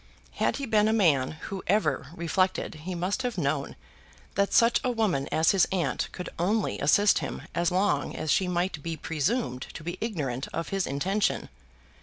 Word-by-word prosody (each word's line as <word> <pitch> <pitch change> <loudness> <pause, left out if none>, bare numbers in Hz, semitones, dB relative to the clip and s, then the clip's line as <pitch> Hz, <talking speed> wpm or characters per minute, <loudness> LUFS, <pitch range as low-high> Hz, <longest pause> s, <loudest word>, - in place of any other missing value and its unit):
Had - - 0
he 275 - -3
been 215 -3 +3
a 220 - +2
man 155 -12 +3
who 195 -2 -5
ever 155 -9 +1
reflected 180 +2 0
he 165 +4 -6
must 185 +8 -1
have 245 -4 -3
known 140 -3 -1 0.6
that 200 +1 +1
such 230 0 +5
a 255 - +1
woman 210 - 0
as 160 +1 +4
his 195 -3 +4
aunt 185 -3 -1
could 180 - -6
only 205 +4 0
assist 200 +8 +4
him - - -5
as 170 0 +1
long 190 +3 +1
as 155 - -1
she 185 - +3
might 175 -3 -1
be 165 +1 -4
presumed 155 - -1
to 155 - -7
be 175 +3 -5
ignorant 145 - -2
of 165 - -3
his 195 -2 -1
intention. 190 +9 0
180 Hz, 180 wpm, -27 LUFS, 155-205 Hz, 0.6 s, such